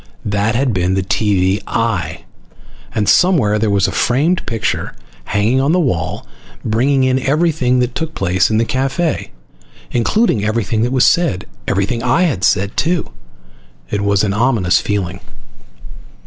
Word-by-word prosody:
That 105 +2 0
had 130 -1 +1
been 95 0 0
the 95 - 0
TV 100 -1 +1
"eye," 115 -6 -2 0.7
and 105 -2 0
somewhere 135 - +3
there 110 0 +1
was 100 -2 +2
a - - -3
framed 150 +9 +1
picture 115 -3 -2 0.3
hanging 110 +6 +1
on 140 +4 +1
the 180 - +3
wall, 90 - -2 0.4
bringing 130 +5 +2
in 130 0 +2
everything 140 -3 +1
that 125 0 -1
took 160 +2 -4
place 95 -1 +1
in 110 - +1
the 115 - +2
cafe, 135 +6 -1 0.6
including 120 - +1
everything 110 0 -1
that 120 +2 0
was 130 -1 +3
said. 160 - +1 0.2
Everything 100 +5 -1
I 170 +8 +2
had 130 - -1
said, 95 +1 +1
too. 170 +1 -1 0.8
It 105 - -1
was 100 0 +1
an 100 -2 0
ominous 110 -5 +2
feeling. 95 -3 -3
115 Hz, 150 wpm, -16 LUFS, 100-135 Hz, 0.8 s, somewhere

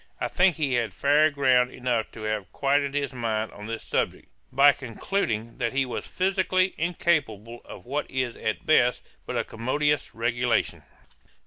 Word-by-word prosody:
I - - -1
think 185 -2 +3
he 145 -4 -1
had 120 -2 0
fair 150 +2 +4
ground 130 -4 +3
enough 120 -4 -2
to 110 - -9
have 110 -3 -3
quieted 140 0 +1
his 140 -1 -1
mind 110 -3 -2
on 105 +1 -10
this 115 0 -5
subject, - - -2 0.2
by 140 +2 +7
concluding 115 - -3
that 115 -1 -1
he 135 0 +1
was 125 - -5
physically 185 0 +1
incapable 150 - -1
of - - -11
what 145 +4 -3
is 130 -3 -2
at 110 - -3
best 125 -5 +3 0.2
but - - -2
a - - +1
commodious 145 +6 -1
regulation. 120 +1 0
130 Hz, 160 wpm, -26 LUFS, 115-145 Hz, 0.2 s, by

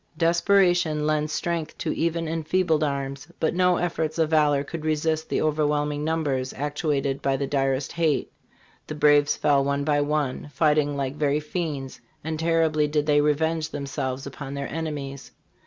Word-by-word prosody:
"Desperation 170 -2 +3
lends 155 0 0
strength 165 0 -3
to - - -2
even 165 0 -1
enfeebled 160 0 +1
arms, 140 0 -3
but 160 - +1
no 180 0 +3
efforts 160 -3 -2
of 160 -1 +1
valor 145 -3 +3
could 155 +2 -7
resist 155 0 0
the - - 0
overwhelming 150 -1 0
numbers 145 -5 -1
actuated 145 -1 -1
by 135 -1 +1
the 140 - -1
direst 135 0 0
hate. 160 -3 0 0.6
The 155 - -5
braves 145 -1 +4
fell 140 -2 +2
one 140 +1 0
by 145 0 +2
one, 145 -1 -1
fighting 150 -1 +2
like 135 -1 -2
very 150 -1 +1
fiends, 150 -5 -4 0.2
and 160 0 -3
terribly 160 -2 +2
did 150 0 0
they 145 -1 +4
revenge 155 +1 +1
themselves 135 -2 -4
upon 140 0 -7
their 140 -1 -4
enemies. 145 -4 -5
150 Hz, 155 wpm, -25 LUFS, 140-160 Hz, 0.6 s, braves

